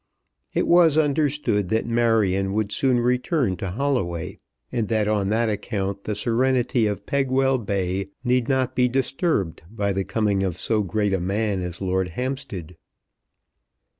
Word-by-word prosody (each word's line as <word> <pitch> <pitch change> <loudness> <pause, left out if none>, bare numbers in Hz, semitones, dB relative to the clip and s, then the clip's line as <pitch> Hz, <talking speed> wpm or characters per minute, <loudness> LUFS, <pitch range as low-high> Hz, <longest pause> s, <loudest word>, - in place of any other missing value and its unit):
It - - +2
was 170 -3 +5
understood 145 - +1
that 110 +2 +1
Marion 110 -5 +1
would 105 -1 -1
soon 130 +2 +2
return 125 - +1
to 95 - -4
Holloway, 100 -7 -2 0.3
and 115 -4 -1
that 110 -1 +1
on 105 -2 +1
that 115 +2 +1
account 100 -2 -3
the 105 - -2
serenity 120 +1 +1
of 105 -1 -4
Pegwell 135 -1 +1
Bay 95 -2 -2
need 125 -1 +1
not 130 -1 +1
be 125 0 +3
disturbed 135 - -1
by 100 -2 -1
the 95 0 -1
coming 105 -2 0
of 95 -3 -1
so 110 +4 0
great 105 +1 0
a 95 - +1
man 100 +1 -1
as 90 0 -5
Lord 95 -1 0
Hampstead. 125 - -4
110 Hz, 150 wpm, -23 LUFS, 95-130 Hz, 0.3 s, was